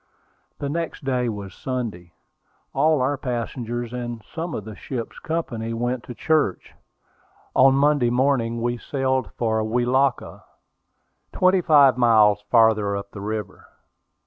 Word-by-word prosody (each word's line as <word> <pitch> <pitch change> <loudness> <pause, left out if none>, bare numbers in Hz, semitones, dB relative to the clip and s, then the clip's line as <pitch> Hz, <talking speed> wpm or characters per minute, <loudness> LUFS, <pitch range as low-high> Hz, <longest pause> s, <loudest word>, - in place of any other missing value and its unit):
The 145 - -4
next 165 +2 -4
day 125 -2 0
was 100 -4 -6
Sunday; 115 -10 -5 0.6
all 150 +1 +3
our 135 +2 0
passengers, 120 -1 -4
and 120 -2 -5
some 165 -2 -4
of 105 - -5
the 110 -1 -8
ship's 120 0 -6
company, 115 -9 -3
went 120 +1 -2
to 125 - -8
church. 155 -10 0 0.8
On 135 +1 +6
Monday 140 -3 +3
morning 120 -2 +1
we 120 0 -1
sailed 130 -2 -1
for 110 -2 0
Welaka, 125 +4 0 0.9
twenty 185 0 +3
five 140 -6 +5
miles 105 -4 +5
farther 110 -4 +3
up 100 0 -8
the 100 - -9
river. 105 0 -5
120 Hz, 130 wpm, -23 LUFS, 110-135 Hz, 0.9 s, On